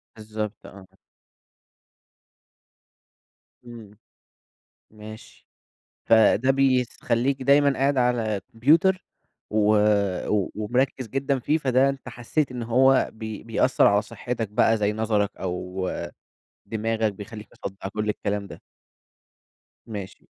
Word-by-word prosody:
بالضبط 110 Hz, 0 st, -6 dB
آه. 95 Hz, -1 st, -12 dB, 2.8 s
إمم. 110 Hz, -4 st, -12 dB, 0.9 s
ماشي. 110 Hz, 0 st, -13 dB, 0.6 s
فده 115 Hz, +3 st, +4 dB
بيخلّيك 130 Hz, -1 st, +1 dB
دايمًا 140 Hz, +1 st, +4 dB
قاعد 140 Hz, +1 st, +2 dB
على 115 Hz, -5 st, +1 dB
كمبيوتر 165 Hz, +10 st, +3 dB, 0.5 s
و 105 Hz, -1 st, +2 dB, 0.6 s
و 105 Hz, -3 st, 0 dB
ومركّز 125 Hz, +3 st, -1 dB
جدًا 135 Hz, +2 st, -1 dB
فيه، 150 Hz, +5 st, 0 dB
فده 130 Hz, -1 st, +2 dB
أنت 135 Hz, -2 st, -5 dB
حسّيت 125 Hz, +5 st, -2 dB
إن 125 Hz, -1 st, -5 dB
هو 130 Hz, +3 st, +3 dB
بي 110 Hz, -1 st, -7 dB
بيأثّر 115 Hz, +3 st, +2 dB
على 100 Hz, 0 st, +4 dB
صحّتك 115 Hz, +1 st, -5 dB
بقى 110 Hz, +2 st, +3 dB
زي 105 Hz, 0 st, 0 dB
نَظَرك 105 Hz, -2 st, -1 dB
أو 90 Hz, 0 st, -4 dB, 0.8 s
دماغك، 110 Hz, -1 st, -1 dB
بيخلّيك 105 Hz, +2 st, -10 dB
مصدّع 95 Hz, 0 st, -7 dB
كل 105 Hz, +2 st, -3 dB
الكلام 100 Hz, -1 st, -2 dB
ده. -, -, -11 dB, 1.3 s
ماشي. 100 Hz, -4 st, -8 dB
115 Hz, 105 wpm, -24 LUFS, 105-130 Hz, 2.8 s, فده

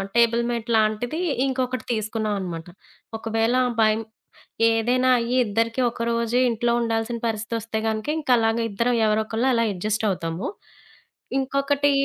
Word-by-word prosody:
Table mat 235 Hz, 0 st, +2 dB
లాంటిది 220 Hz, +8 st, 0 dB, 0.3 s
ఇంకొకటి 255 Hz, -1 st, -2 dB
తీసుకున్నాం 215 Hz, -1 st, -2 dB
అనమాట. 170 Hz, -2 st, -5 dB, 0.5 s
ఒకవేళ 225 Hz, +1 st, 0 dB, 0.3 s
బైం 215 Hz, +1 st, +3 dB, 0.7 s
ఏదైనా 250 Hz, +3 st, +2 dB
అయ్యి 240 Hz, +2 st, -1 dB
ఇద్దరికి 225 Hz, +4 st, 0 dB
ఒకరోజే 235 Hz, +1 st, 0 dB
ఇంట్లో 235 Hz, +1 st, 0 dB
ఉండాల్సిన 230 Hz, 0 st, -1 dB
పరిస్థితొస్తే 225 Hz, 0 st, -3 dB
కనుక 220 Hz, +3 st, -2 dB
ఇంక 290 Hz, -, -8 dB
అలాగే 225 Hz, 0 st, +1 dB
ఇద్దరం 235 Hz, +5 st, +1 dB
ఎవరో 215 Hz, +1 st, +2 dB
ఒకళ్ళు 225 Hz, +4 st, -1 dB
అలా 230 Hz, -1 st, +2 dB
అడ్జస్ట్ 215 Hz, +4 st, -1 dB
అవుతాము. 165 Hz, -1 st, -3 dB, 0.9 s
ఇంకొకటి 275 Hz, +2 st, +1 dB
230 Hz, 120 wpm, -23 LUFS, 215-240 Hz, 0.9 s, బైం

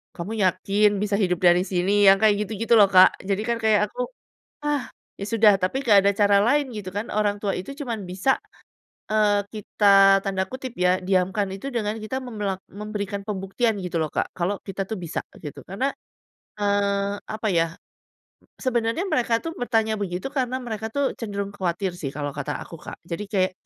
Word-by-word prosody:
"Kamu 180 Hz, +5 st, -5 dB
yakin 195 Hz, +3 st, +3 dB
bisa 205 Hz, -1 st, 0 dB
hidup 180 Hz, -4 st, +1 dB
dari 175 Hz, +1 st, +5 dB
sini?" 195 Hz, +3 st, +2 dB
Yang 195 Hz, 0 st, +8 dB
kayak 210 Hz, -1 st, +5 dB
gitu-gitu 225 Hz, +2 st, 0 dB
loh, 200 Hz, -2 st, +7 dB
Kak, 185 Hz, -1 st, +8 dB, 0.2 s
jadi 195 Hz, +1 st, +1 dB
kan 235 Hz, -, +1 dB
kayak 215 Hz, -2 st, +4 dB
aku. -, -, -4 dB, 0.6 s
"Ah, 290 Hz, -5 st, -1 dB, 0.3 s
ya 200 Hz, -, -4 dB
sudah." 220 Hz, -2 st, +6 dB
Tapi 185 Hz, +8 st, 0 dB
gak 205 Hz, -2 st, +7 dB
ada 200 Hz, -, +5 dB
cara 200 Hz, -1 st, +4 dB
lain 285 Hz, +2 st, +2 dB
gitu 205 Hz, -3 st, -5 dB
kan, 210 Hz, +3 st, -3 dB
orang 205 Hz, -1 st, +1 dB
tua 200 Hz, -2 st, 0 dB
itu 185 Hz, -, -7 dB
cuman 230 Hz, -8 st, -4 dB
bisa, 190 Hz, +9 st, +1 dB, 0.7 s
eee, 210 Hz, -1 st, +3 dB
kita 195 Hz, -2 st, +5 dB
tanda 190 Hz, -1 st, 0 dB
kutip 260 Hz, -1 st, -6 dB
ya, 180 Hz, +1 st, +3 dB
"diamkan" 190 Hz, +2 st, +1 dB
itu 235 Hz, +8 st, -6 dB
dengan 215 Hz, -2 st, -1 dB
kita 240 Hz, +5 st, -3 dB
memelak 205 Hz, -6 st, -4 dB
memberikan 205 Hz, -1 st, -5 dB
pembuktian 210 Hz, +3 st, -1 dB
gitu 180 Hz, -2 st, -3 dB
loh 155 Hz, -, -1 dB
Kak, -, -, -1 dB
kalau 185 Hz, +3 st, -1 dB
kita 195 Hz, 0 st, -4 dB
tuh 220 Hz, -, -3 dB
bisa, 170 Hz, -2 st, -3 dB, 0.2 s
gitu. 150 Hz, -, -7 dB
Karena, 230 Hz, +9 st, -1 dB, 0.7 s
eee, 200 Hz, 0 st, +1 dB
apa 215 Hz, 0 st, -4 dB
ya, 165 Hz, -1 st, +3 dB, 0.9 s
sebenarnya 240 Hz, -, 0 dB
mereka 235 Hz, -5 st, +2 dB
tuh 330 Hz, -, -3 dB
bertanya 225 Hz, -2 st, +1 dB
begitu 180 Hz, -2 st, -3 dB
karena 255 Hz, -2 st, -1 dB
mereka 220 Hz, -2 st, -4 dB
tuh 280 Hz, -1 st, 0 dB
cenderung 200 Hz, -3 st, -4 dB
khawatir 185 Hz, +1 st, -1 dB
sih 145 Hz, -6 st, -4 dB
kalau 145 Hz, -1 st, -3 dB
kata 145 Hz, +1 st, -3 dB
aku, -, -, -15 dB
Kak. -, -, -9 dB
Jadi 175 Hz, +4 st, -4 dB
kayak, 185 Hz, -3 st, +2 dB
205 Hz, 180 wpm, -24 LUFS, 190-220 Hz, 0.9 s, Yang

